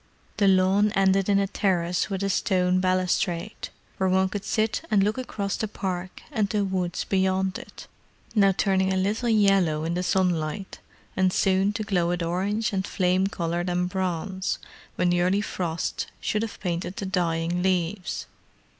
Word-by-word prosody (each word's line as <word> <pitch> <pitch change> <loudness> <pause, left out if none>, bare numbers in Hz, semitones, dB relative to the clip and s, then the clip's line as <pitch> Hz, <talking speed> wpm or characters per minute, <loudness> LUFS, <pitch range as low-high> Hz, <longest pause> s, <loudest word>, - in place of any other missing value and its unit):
The 200 - +3
lawn 195 +2 +4
ended 195 0 +3
in 200 - +4
a 200 - +2
terrace 180 -3 0
with 195 -1 -2
a 195 - 0
stone 185 -2 +2
balustrade, 185 -1 0 0.3
where 190 0 +1
one 190 0 +3
could 205 0 -4
sit 220 0 0
and 200 -2 +4
look 210 +5 0
across 200 -6 -3
the 220 - -2
park 185 -3 -5
and 215 -7 0
to 205 0 0
woods 185 -2 -2
beyond 190 0 0
it—now 200 -3 -2
turning 190 -1 +2
a 190 - +1
little 210 +6 0
yellow 195 -8 +3
in 165 +1 -1
the 180 - -1
sunlight, 180 -1 -1 0.4
and 185 -1 +3
soon 190 +2 +2
to 215 0 -3
glow 185 -5 +1
with 175 0 -1
orange 200 +6 -1
and 190 0 -1
flame 185 0 +1
colour 170 -3 -2
and 180 0 0
bronze, 185 +1 -2 0.4
when 180 - +2
the 175 0 +2
early 185 +3 +2
frosts 180 +3 -3
should 210 - -1
have 225 -2 -5
painted 175 0 -3
the 200 - -4
dying 175 -2 0
leaves. 180 0 -1
190 Hz, 165 wpm, -25 LUFS, 180-200 Hz, 0.4 s, lawn